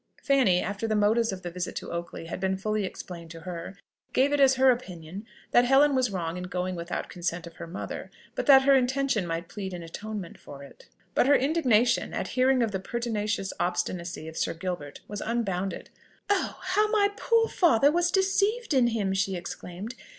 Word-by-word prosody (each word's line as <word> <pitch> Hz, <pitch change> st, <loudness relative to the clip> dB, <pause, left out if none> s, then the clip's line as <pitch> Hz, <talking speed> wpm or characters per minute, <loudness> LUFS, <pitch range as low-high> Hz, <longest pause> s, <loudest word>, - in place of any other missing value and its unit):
Fanny, 255 Hz, -11 st, +3 dB
after 205 Hz, +3 st, -3 dB
the 215 Hz, -, 0 dB
motives 220 Hz, +2 st, +3 dB
of 185 Hz, -1 st, -7 dB
the 175 Hz, -, -5 dB
visit 180 Hz, 0 st, -4 dB
to -, -, -5 dB
Oakley 170 Hz, -1 st, -5 dB
had 165 Hz, -, -5 dB
been 190 Hz, 0 st, 0 dB
fully 215 Hz, +1 st, -1 dB
explained 170 Hz, -2 st, -8 dB
to 165 Hz, 0 st, -10 dB
her, 180 Hz, +2 st, -7 dB, 0.4 s
gave 275 Hz, +3 st, +3 dB
it 290 Hz, -, +2 dB
as 270 Hz, -1 st, +6 dB
her 260 Hz, 0 st, +6 dB
opinion 190 Hz, -4 st, -6 dB, 0.2 s
that 240 Hz, -, +6 dB
Helen 275 Hz, +3 st, +5 dB
was 255 Hz, -2 st, +2 dB
wrong 175 Hz, -3 st, -3 dB
in 180 Hz, -, -5 dB
going 180 Hz, 0 st, -2 dB
without 170 Hz, 0 st, -3 dB
the -, -, -16 dB
consent 175 Hz, -1 st, -3 dB
of 170 Hz, -, -12 dB
her -, -, -7 dB
mother, 170 Hz, -, -6 dB, 0.2 s
but -, -, -3 dB
that 270 Hz, -2 st, +8 dB
her 275 Hz, +1 st, +5 dB
intention 260 Hz, -6 st, +1 dB
might 165 Hz, +1 st, -3 dB
plead 190 Hz, -2 st, -6 dB
in 175 Hz, -, -7 dB
atonement 205 Hz, +2 st, -7 dB
for 140 Hz, -1 st, -11 dB
it. 140 Hz, -, -15 dB, 0.3 s
But -, -, +3 dB
her 285 Hz, -, +6 dB
indignation 250 Hz, -6 st, +2 dB
at -, -, -3 dB
hearing 255 Hz, 0 st, +3 dB
of 225 Hz, -, -1 dB
the 190 Hz, -, -2 dB
pertinacious 210 Hz, -2 st, -2 dB
obstinacy 175 Hz, -1 st, -2 dB
of 160 Hz, -, -8 dB
Sir -, -, -1 dB
Gilbert 165 Hz, -4 st, -5 dB
was 205 Hz, -1 st, -5 dB
unbounded. 195 Hz, -5 st, -2 dB, 0.4 s
"Oh! 395 Hz, -2 st, 0 dB
how 405 Hz, +3 st, +2 dB
my 415 Hz, -2 st, +3 dB
poor 455 Hz, +1 st, +2 dB
father 285 Hz, -, +4 dB
was 345 Hz, +2 st, +2 dB
deceived 395 Hz, +3 st, +1 dB
in 255 Hz, -3 st, +4 dB
him!" 210 Hz, -5 st, 0 dB
she 190 Hz, 0 st, 0 dB
exclaimed. 180 Hz, +4 st, -7 dB
210 Hz, 200 wpm, -27 LUFS, 180-265 Hz, 0.4 s, that